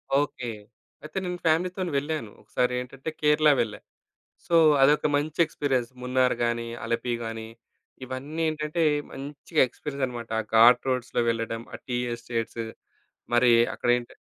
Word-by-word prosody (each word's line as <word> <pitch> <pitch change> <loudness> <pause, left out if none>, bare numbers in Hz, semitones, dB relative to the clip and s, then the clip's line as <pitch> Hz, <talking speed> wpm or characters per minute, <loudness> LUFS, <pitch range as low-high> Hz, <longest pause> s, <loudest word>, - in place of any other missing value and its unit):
Okay. 140 -4 0 0.5
అయితే 155 +4 -8
నేను 180 0 -4
ఫ్యామిలీ‌తో‌ని 180 +3 +1
వెళ్ళాను. 145 -7 -3
ఒకసారేంటంటే, 125 +4 -2
కేరళ 150 0 +4
వెళ్ళా. 110 -3 -3 0.7
సో, 175 - -5 0.3
అదొక 145 +3 +5
మంచి 150 +3 -2
ఎక్స్‌పీరియన్స్ 130 -6 -1
మున్నార్ 125 0 +2
గాని, 120 0 -1 0.2
అలపి 115 +1 -1
గాని 115 0 -5 0.6
ఇవన్నీ 140 +5 -5
ఏంటంటే, 155 +2 -1 0.3
మంచిగా 145 +3 -2
ఎక్స్‌పీరియన్స్ 140 +1 -4
అనమాట. 120 -2 -7
ఆ - - +1
ఘాట్ 120 +3 +7
రోడ్స్‌లో 125 -1 0
వెళ్లడం. 115 0 -2
ఆ - - -5
టీ 120 -1 -1 0.2
ఎస్టేట్సు 115 -1 -4 0.7
మరి 120 0 +5 0.2
అక్కడ - - -4
ఏంట 120 - -10
130 Hz, 130 wpm, -26 LUFS, 120-150 Hz, 0.7 s, ఘాట్